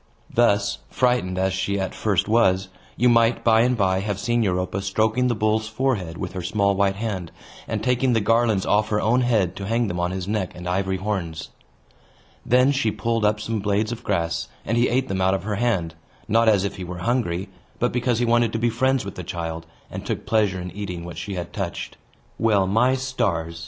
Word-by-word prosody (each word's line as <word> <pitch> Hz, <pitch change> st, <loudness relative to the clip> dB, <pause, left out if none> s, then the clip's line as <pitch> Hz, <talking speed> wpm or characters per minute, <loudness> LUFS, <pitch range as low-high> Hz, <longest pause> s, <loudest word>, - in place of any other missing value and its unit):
Thus, 105 Hz, -4 st, +2 dB
frightened 125 Hz, -8 st, +1 dB
as 95 Hz, 0 st, +1 dB
she 95 Hz, +1 st, -1 dB
at 95 Hz, -1 st, -2 dB
first 100 Hz, -5 st, 0 dB
was, 95 Hz, -4 st, +3 dB, 0.3 s
you 125 Hz, -, +3 dB
might 115 Hz, 0 st, +3 dB
by 110 Hz, -1 st, +5 dB
and 125 Hz, +1 st, +2 dB
by 95 Hz, -2 st, +2 dB
have 100 Hz, 0 st, -2 dB
seen 120 Hz, +3 st, +1 dB
Europa 95 Hz, -1 st, -1 dB
stroking 110 Hz, +6 st, +1 dB
the 120 Hz, -, +1 dB
bull's 110 Hz, +1 st, +1 dB
forehead 110 Hz, -8 st, -1 dB
with 90 Hz, -1 st, -5 dB
her 95 Hz, -, -4 dB
small 100 Hz, +2 st, +1 dB
white 100 Hz, 0 st, +2 dB
hand, 100 Hz, -5 st, -4 dB, 0.4 s
and -, -, -3 dB
taking 125 Hz, +1 st, +2 dB
the 115 Hz, -, +3 dB
garlands 110 Hz, -2 st, +2 dB
off 105 Hz, +1 st, +2 dB
her 105 Hz, -, +1 dB
own 120 Hz, +4 st, +2 dB
head 105 Hz, -8 st, +1 dB
to 95 Hz, -, -5 dB
hang 115 Hz, +2 st, +1 dB
them 90 Hz, -2 st, -3 dB
on 90 Hz, 0 st, 0 dB
his 95 Hz, 0 st, -4 dB
neck 105 Hz, -3 st, -2 dB
and 90 Hz, 0 st, -7 dB
ivory 95 Hz, +1 st, 0 dB
horns. 90 Hz, -5 st, -3 dB, 0.9 s
Then 125 Hz, +3 st, +4 dB
she 135 Hz, -5 st, +1 dB
pulled 115 Hz, +1 st, -1 dB
up 105 Hz, 0 st, +2 dB
some 110 Hz, +1 st, -2 dB
blades 105 Hz, +2 st, 0 dB
of 120 Hz, 0 st, -6 dB
grass, 85 Hz, -4 st, -1 dB, 0.2 s
and 115 Hz, -, 0 dB
he 120 Hz, +1 st, +3 dB
ate 130 Hz, +2 st, +1 dB
them 95 Hz, -1 st, -2 dB
out 95 Hz, +1 st, +3 dB
of 95 Hz, -, -4 dB
her 105 Hz, 0 st, -2 dB
hand, 95 Hz, -9 st, 0 dB, 0.3 s
not 115 Hz, +1 st, +4 dB
as 100 Hz, -3 st, +3 dB
if 100 Hz, -, -3 dB
he 95 Hz, -, -5 dB
were 90 Hz, 0 st, -6 dB
hungry, 100 Hz, -7 st, 0 dB, 0.3 s
but 125 Hz, -, 0 dB
because 125 Hz, -1 st, +1 dB
he 120 Hz, -, +1 dB
wanted 120 Hz, -1 st, +3 dB
to -, -, 0 dB
be 120 Hz, +1 st, +1 dB
friends 130 Hz, 0 st, +1 dB
with 100 Hz, -, -6 dB
the 90 Hz, -, -7 dB
child, 80 Hz, -1 st, -5 dB, 0.2 s
and -, -, -6 dB
took -, -, -4 dB
pleasure 105 Hz, -4 st, +1 dB
in 90 Hz, 0 st, -6 dB
eating 90 Hz, -4 st, -6 dB
what 85 Hz, -, -7 dB
she 100 Hz, -, -5 dB
had 85 Hz, -2 st, -5 dB
touched. -, -, -4 dB, 0.4 s
Well, 105 Hz, -4 st, +3 dB
my 115 Hz, +7 st, +3 dB
stars! 100 Hz, -11 st, -2 dB
105 Hz, 215 wpm, -23 LUFS, 95-115 Hz, 0.9 s, by